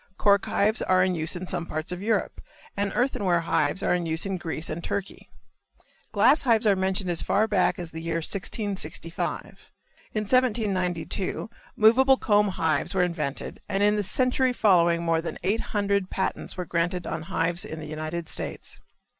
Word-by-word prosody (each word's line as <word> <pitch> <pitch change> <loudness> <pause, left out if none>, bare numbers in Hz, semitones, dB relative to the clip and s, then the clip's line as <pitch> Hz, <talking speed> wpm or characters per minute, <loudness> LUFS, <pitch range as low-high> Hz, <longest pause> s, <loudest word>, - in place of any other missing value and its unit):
Cork 200 -1 +3
hives 215 +3 +1
are 185 0 +3
in 185 0 +1
use 160 0 -1
in 180 +1 -5
some 170 -1 -2
parts 155 +2 -3
of 180 0 -4
Europe, 215 -1 -1 0.3
and 200 0 -1
earthenware 205 -9 +1
hives 165 +2 0
are - - +2
in 175 -1 -1
use 160 +2 0
in 195 -1 -2
Greece 165 -2 -5
and 165 +2 -5
Turkey. 200 -1 -5 0.8
Glass 255 +9 +4
hives 230 -3 +3
are 205 -2 +5
mentioned 190 0 0
as 170 - 0
far 215 +2 +2
back 200 -4 +2
as 175 -2 -7
the 160 - -7
year 165 0 -3
1665. 180 -1 -3 0.7
In 215 - +1
1792 205 -5 0 0.2
movable 260 +5 +5
comb 210 -3 +3
hives 160 -3 -1
were 185 - +3
invented 155 -5 -3
and 195 +1 +1
in 210 0 +4
the 210 - +1
century 255 +5 +2
following 170 -6 +3
more 165 -1 +1
than 170 - -5
eight 210 +4 +1
hundred 200 -2 0
patents 190 - -3
were 180 - -3
granted 175 +1 -1
on 160 - -3
hives 170 0 -1
in 160 - -7
the 155 - -7
United 155 +2 -5
States. - - -4
185 Hz, 175 wpm, -26 LUFS, 170-205 Hz, 0.8 s, are